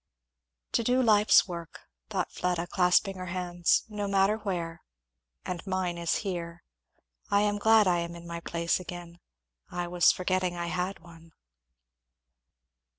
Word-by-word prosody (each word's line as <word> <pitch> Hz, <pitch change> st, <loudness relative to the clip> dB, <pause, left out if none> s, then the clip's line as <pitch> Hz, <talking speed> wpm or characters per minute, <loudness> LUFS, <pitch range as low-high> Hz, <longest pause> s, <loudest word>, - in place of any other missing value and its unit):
"To 235 Hz, -, +1 dB
do 250 Hz, +3 st, +2 dB
life's 215 Hz, -3 st, +5 dB
work!" 170 Hz, -2 st, -8 dB, 0.3 s
thought -, -, -2 dB
Fleda 175 Hz, -1 st, -1 dB
clasping 180 Hz, +2 st, +2 dB
her 185 Hz, 0 st, -6 dB
hands, 175 Hz, -1 st, +1 dB
"no 210 Hz, -2 st, -4 dB
matter 195 Hz, +2 st, +2 dB
where 170 Hz, -6 st, -4 dB, 0.6 s
and 180 Hz, -2 st, -4 dB
mine 185 Hz, -2 st, -1 dB
is 170 Hz, -1 st, 0 dB
here. 170 Hz, -3 st, -5 dB, 0.7 s
I 200 Hz, 0 st, +3 dB
am 205 Hz, 0 st, +1 dB
glad 220 Hz, 0 st, +5 dB
I 175 Hz, -1 st, +3 dB
am 170 Hz, 0 st, -4 dB
in 170 Hz, 0 st, -11 dB
my 170 Hz, 0 st, -5 dB
place 170 Hz, +1 st, -1 dB
again 175 Hz, -1 st, -9 dB, 0.5 s
I 175 Hz, 0 st, -3 dB
was 175 Hz, 0 st, +4 dB
forgetting 185 Hz, -1 st, -1 dB
I 170 Hz, 0 st, -3 dB
had 180 Hz, +1 st, -3 dB
one." 165 Hz, -1 st, -16 dB
180 Hz, 145 wpm, -28 LUFS, 170-195 Hz, 0.7 s, life's